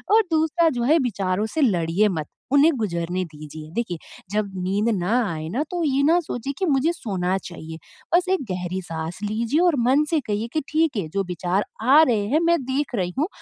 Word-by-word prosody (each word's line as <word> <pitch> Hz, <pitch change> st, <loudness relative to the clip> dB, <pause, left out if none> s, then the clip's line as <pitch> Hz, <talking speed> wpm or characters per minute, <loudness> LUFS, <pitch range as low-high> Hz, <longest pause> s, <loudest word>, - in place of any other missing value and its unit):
और 450 Hz, -, +7 dB
दूसरा 320 Hz, +1 st, +3 dB
जो -, -, 0 dB
है 310 Hz, +7 st, +4 dB
विचारों 195 Hz, -1 st, -1 dB
से 320 Hz, -, +1 dB
लड़िए 185 Hz, -, +2 dB
मत 155 Hz, -6 st, -3 dB, 0.3 s
उन्हें 290 Hz, +3 st, +6 dB
गुज़रने 180 Hz, -4 st, -2 dB
दीजिए। 155 Hz, -1 st, -10 dB
देखिए 225 Hz, -6 st, -2 dB, 0.3 s
जब 210 Hz, -1 st, 0 dB
नींद 200 Hz, +5 st, +1 dB
ना 180 Hz, +4 st, -1 dB, 0.2 s
आए 155 Hz, -1 st, -5 dB
ना 260 Hz, +10 st, -1 dB
तो 350 Hz, -1 st, -1 dB
ये 275 Hz, -3 st, +2 dB
ना 330 Hz, +4 st, +4 dB
सोचिए 275 Hz, -3 st, -4 dB
कि 385 Hz, -, +1 dB
मुझे 295 Hz, 0 st, +2 dB
सोना 190 Hz, -, -1 dB
चाहिए 160 Hz, -3 st, -8 dB, 0.4 s
बस 360 Hz, +1 st, +3 dB
1 375 Hz, -6 st, +1 dB
गहरी 180 Hz, +1 st, -3 dB
साँस 165 Hz, -1 st, -6 dB
लीजिए 225 Hz, +7 st, 0 dB
और 345 Hz, -4 st, +4 dB
मन 275 Hz, +4 st, +4 dB
से 325 Hz, -, +2 dB
कहिए 210 Hz, +2 st, -1 dB
कि 310 Hz, -, +1 dB
ठीक 315 Hz, -4 st, +2 dB
है 190 Hz, -6 st, -2 dB
जो 195 Hz, +5 st, -1 dB
विचार 180 Hz, +3 st, -1 dB, 0.2 s
आ 270 Hz, +7 st, +7 dB
रहे 225 Hz, -8 st, +1 dB
हैं, 290 Hz, +8 st, +2 dB
मैं 340 Hz, -1 st, +2 dB
देख 265 Hz, 0 st, -1 dB
रही 180 Hz, -4 st, -1 dB
हूँ 310 Hz, -, +2 dB
215 Hz, 205 wpm, -23 LUFS, 180-295 Hz, 0.4 s, और